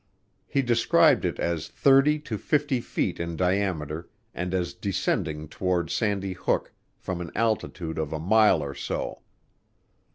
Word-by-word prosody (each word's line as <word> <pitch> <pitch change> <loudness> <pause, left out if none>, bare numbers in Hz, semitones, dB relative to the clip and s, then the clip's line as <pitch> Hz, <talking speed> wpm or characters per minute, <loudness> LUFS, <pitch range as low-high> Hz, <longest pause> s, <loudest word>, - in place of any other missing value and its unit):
He 135 - +1
described 120 -2 +4
it - - -1
as 85 -2 -2
30 140 +2 +4
to 110 -8 -5
50 145 -4 +1
feet - - -2
in 85 0 -3
diameter 90 -4 -1 0.2
and 90 +1 -3
as 90 -2 -1
descending 80 -5 -2
toward 90 0 -1
Sandy 100 -3 0
Hook 90 -1 -1 0.2
from 90 -1 -4
an 85 - -5
altitude 95 -7 -1
of 80 -1 -2
a 80 - -2
mile 100 -1 +4
or 70 -1 -5
so. 70 - -4
90 Hz, 140 wpm, -26 LUFS, 80-110 Hz, 0.2 s, described